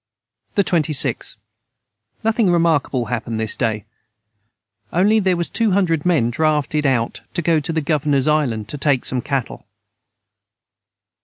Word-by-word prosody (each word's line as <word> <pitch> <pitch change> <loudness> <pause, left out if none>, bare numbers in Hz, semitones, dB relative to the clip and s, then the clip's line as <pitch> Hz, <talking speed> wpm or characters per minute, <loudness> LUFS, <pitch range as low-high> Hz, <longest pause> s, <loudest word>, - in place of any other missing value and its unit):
the 200 - +3
26. 155 -5 +1 0.9
Nothing 220 -2 +2
remarkable 160 -7 +1
hapened 110 0 -4
this 110 -1 +1
day 110 -3 -2 1.1
onely 205 +5 +3
their 185 -3 +1
was 170 - -1
200 185 -7 +1
men 140 -10 +2
draughted 150 +1 0
out 120 -3 -1
to - - 0
go 165 -1 +2
to 150 - -3
the 160 0 -1
governors 145 -2 +1
Island 130 -9 0
to 145 - -4
take 140 -3 +1
some 125 -1 -1
cattle. 135 -1 -4
150 Hz, 130 wpm, -19 LUFS, 130-170 Hz, 1.1 s, the